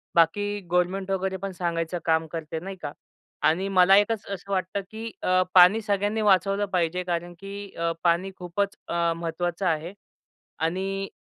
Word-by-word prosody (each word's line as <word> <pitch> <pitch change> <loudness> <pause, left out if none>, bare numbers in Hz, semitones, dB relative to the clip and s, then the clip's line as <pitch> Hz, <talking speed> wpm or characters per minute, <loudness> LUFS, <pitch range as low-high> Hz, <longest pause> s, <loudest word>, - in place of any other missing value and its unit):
बाकी 205 +5 +2
गव्हर्नमेंट 185 +2 +1
वगैरे 190 0 -1
पण 195 - -2
सांगायचं 170 -1 -2
काम 160 0 +2
करते, 160 -1 -4
नाही 190 +3 -7
का. 145 - -4 0.5
आणि 165 +6 +2
मला 190 0 +6
एकच 210 +1 +1
असं 200 0 -7
वाटतं, 190 +1 -1
की 225 +1 -6
अ, 185 0 +3
पाणी 185 +4 +7
सगळ्यांनी 205 +1 0
वाचवलं 195 0 +3
पाहिजे 180 0 +1
कारण 175 0 -3
की 200 0 -8
अ, 170 0 0
पाणी 175 +3 +2
खूपच 190 +3 -2
अ, 170 0 +1
महत्त्वाचं 170 +2 -3
आहे 165 +1 -1 0.7
आणि 190 +4 -1
185 Hz, 155 wpm, -26 LUFS, 170-195 Hz, 0.7 s, पाणी